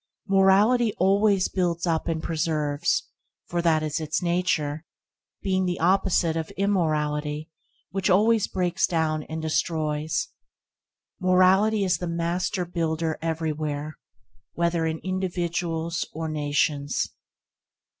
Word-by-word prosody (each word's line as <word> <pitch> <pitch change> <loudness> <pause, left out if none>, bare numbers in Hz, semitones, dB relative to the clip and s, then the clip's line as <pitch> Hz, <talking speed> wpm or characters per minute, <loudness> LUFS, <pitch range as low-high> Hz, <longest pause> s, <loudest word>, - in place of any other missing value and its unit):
Morality 205 +5 +4
always 195 +1 +3
builds 175 -2 -1
up 165 -2 0
and 160 -1 -2
preserves, 155 - 0 0.4
for 175 - -2
that 160 -2 +2
is 155 +1 -2
its 155 -2 -1
nature, 170 -4 0 0.6
being 190 -1 +1
the 175 - -2
opposite 180 -2 +2
of 160 -1 -3
immorality, 155 -5 0 0.4
which 195 +1 -1
always 215 +3 +4
breaks 180 -2 0
down 160 -3 0
and 160 +1 -6
destroys. 155 - -1 0.9
Morality 190 +3 +4
is 180 -3 +1
the 175 - -3
master–builder 170 -1 -1
everywhere, 155 -2 -3 0.6
whether 170 -1 0
in 160 0 -2
individuals 175 -3 -2
or 160 +1 -4
nations. 145 -1 0
170 Hz, 105 wpm, -25 LUFS, 155-185 Hz, 0.9 s, Morality